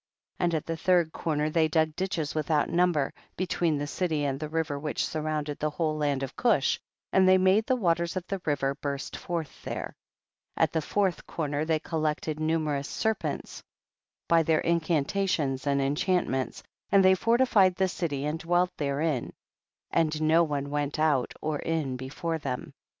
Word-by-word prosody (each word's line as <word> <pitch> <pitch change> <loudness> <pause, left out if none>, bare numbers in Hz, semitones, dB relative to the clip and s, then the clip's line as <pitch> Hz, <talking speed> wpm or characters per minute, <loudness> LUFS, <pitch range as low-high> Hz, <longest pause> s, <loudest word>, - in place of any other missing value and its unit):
And 175 -2 +1
at 155 - -2
the 165 - -2
third 175 -2 +3
corner 155 -1 -1
they 160 0 +3
dug 155 0 +1
ditches 180 -5 -2
without 155 -1 +1
number, 170 -5 +2 0.2
between 170 -3 0
the 145 - -2
city 155 -1 -1
and 135 -1 -1
the 155 -1 -4
river 155 -3 -1
which 150 +1 -1
surround 155 -1 -2
ed 145 - -5
the 155 - 0
whole 155 0 -1
land 145 -3 0
of 135 - -5
Cush, 215 - +2 0.3
and 190 -1 +5
they 185 - +7
made 190 +4 +3
the 260 - +3
waters 170 -6 0
of 185 -2 -3
the 195 0 -4
river 140 -2 0
burst 140 -1 -4
forth 170 -3 -5
there. - - -5 0.6
10. - - +3
At - - +1
the 160 - +1
fourth 190 +2 -1
corner 150 -1 -2
they 160 0 +2
col 160 +1 -4
lected 155 0 -1
numerous 155 -3 0
serpents 220 -1 -2 0.7
by 170 -1 +5
their 160 -1 +2
incantations 160 -3 0
and 140 0 +2
enchantments, 140 -1 0 0.3
and 195 -1 +6
they 190 - +7
fortified 225 -3 +3
the 190 +1 +2
city 150 -6 -2
and 150 +2 -2
dwelt 175 +2 +1
there 140 -1 -1
in, 150 -7 -1 0.6
and 155 -2 +1
no 155 +2 +4
one 145 -3 -2
went 145 0 -1
out 150 -5 +2
or 155 -1 -1
in 155 -5 -1
before 145 +6 -3
them. 130 -4 -4
155 Hz, 175 wpm, -28 LUFS, 145-175 Hz, 0.7 s, they